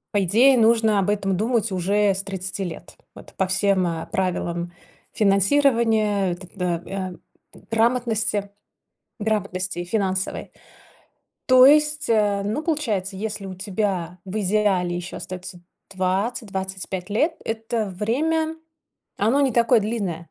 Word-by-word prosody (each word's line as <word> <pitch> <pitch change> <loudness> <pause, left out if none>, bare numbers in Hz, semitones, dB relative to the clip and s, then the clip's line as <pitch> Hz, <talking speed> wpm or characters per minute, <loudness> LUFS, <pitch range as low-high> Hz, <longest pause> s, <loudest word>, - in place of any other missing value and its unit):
По 200 - +3
идее 240 +9 +5
нужно 225 -2 +4
об 195 +1 0
этом 195 -2 0
думать 225 +1 0
уже 200 +3 +2
с 190 +1 -4
30 195 0 -5
лет, 175 -4 -6 0.2
вот - - -14
по 190 - 0
всем, 195 0 +2
э, 165 -1 -3
правилам 175 -2 -2 0.4
финансирования, 215 -2 +2
э, - - -2
т 185 +1 -13
э, 175 -2 -2
э, 185 -2 -8
грамотности 225 -3 +1 0.7
грамотности, 195 -4 -2
финансовой. 190 -1 -2 1.0
То 255 0 +7
есть, 300 +1 +4
э, 210 -3 +2
ну 220 +10 -2
получается, 215 - -1
если 205 0 -4
у 190 - -6
тебя 185 -2 -3
в 195 +2 -6
идеале 190 -3 +1
еще 175 +1 -6
остается 180 0 -8 0.3
20-25 190 -1 -3
лет, 300 +11 +1
это 225 0 -2
время, 310 - -1 0.6
оно 230 +8 +2
не 275 -2 +3
такое 235 0 +4
длинное. 195 -7 -3
200 Hz, 125 wpm, -23 LUFS, 185-225 Hz, 1.0 s, То